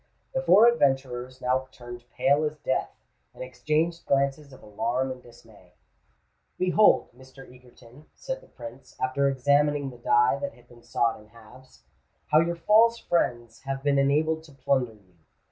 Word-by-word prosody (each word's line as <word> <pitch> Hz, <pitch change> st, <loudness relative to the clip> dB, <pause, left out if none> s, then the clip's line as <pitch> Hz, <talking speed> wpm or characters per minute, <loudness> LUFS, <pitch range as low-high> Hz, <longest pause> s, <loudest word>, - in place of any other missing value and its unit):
The -, -, -1 dB
four 230 Hz, -, +6 dB
adventurers 135 Hz, -, 0 dB
now 130 Hz, +1 st, 0 dB
turned 120 Hz, -1 st, -11 dB
pale 140 Hz, +3 st, +1 dB
as 155 Hz, 0 st, -3 dB
death, 130 Hz, -, -2 dB, 0.5 s
and -, -, -7 dB
exchanged 155 Hz, +7 st, -2 dB
glances 140 Hz, +1 st, 0 dB
of 130 Hz, -, -15 dB
alarm 115 Hz, +5 st, -2 dB
and 130 Hz, -1 st, -8 dB
dismay. 120 Hz, -1 st, -19 dB, 0.8 s
"Behold, 185 Hz, +3 st, +3 dB
Mr. 130 Hz, +1 st, -15 dB
Egerton," 125 Hz, +2 st, -18 dB
said -, -, -6 dB
the -, -, -19 dB
Prince, 120 Hz, +2 st, -12 dB
after 130 Hz, +2 st, 0 dB
examining 145 Hz, +1 st, +1 dB
the 120 Hz, -, -15 dB
die 120 Hz, +1 st, +2 dB
that 185 Hz, +5 st, -5 dB
had 120 Hz, 0 st, -22 dB
been 120 Hz, -1 st, -18 dB
sawed 115 Hz, -1 st, -1 dB
in 105 Hz, -, -19 dB
halves, 115 Hz, -, -18 dB, 0.5 s
"how 155 Hz, -, +6 dB
your 170 Hz, +1 st, 0 dB
false 220 Hz, +7 st, +4 dB
friends 120 Hz, -, -2 dB
have 135 Hz, 0 st, -5 dB
been 140 Hz, -1 st, +2 dB
enabled 155 Hz, +3 st, +1 dB
to 150 Hz, -, -17 dB
plunder 130 Hz, -3 st, -1 dB
you. 95 Hz, -4 st, -27 dB
135 Hz, 160 wpm, -26 LUFS, 120-150 Hz, 0.8 s, four